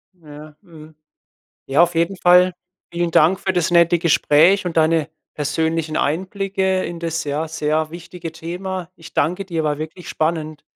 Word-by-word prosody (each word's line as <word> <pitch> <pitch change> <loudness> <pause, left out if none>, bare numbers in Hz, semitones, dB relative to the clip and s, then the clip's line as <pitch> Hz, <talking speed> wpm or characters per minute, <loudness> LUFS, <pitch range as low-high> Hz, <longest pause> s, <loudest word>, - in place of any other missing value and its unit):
Ja, 150 -2 -13
mhm. 160 -5 -15 0.7
Ja 140 +5 +4
auf 175 0 +2
jeden 170 +4 0
Fall 180 0 +5 0.4
vielen 170 0 -1
Dank 165 +4 +4
für 190 - -1
das 180 -1 0
nette 170 0 +4
Gespräch 170 +3 +3
und 170 -2 -4
deine 160 -1 +2 0.3
persönlichen 160 +2 -1
Einblicke 190 +3 -1
in 170 0 -5
das, 165 0 -3
ja, 150 +2 -2
sehr 155 0 -1
wichtige 170 -1 -8
Thema. 180 +2 -6
Ich 165 -1 -14
danke 180 +5 0
dir, 165 -4 -3
war 150 -1 -1
wirklich 160 +3 -8
spannend. 155 -1 -2
165 Hz, 155 wpm, -20 LUFS, 155-180 Hz, 0.7 s, Fall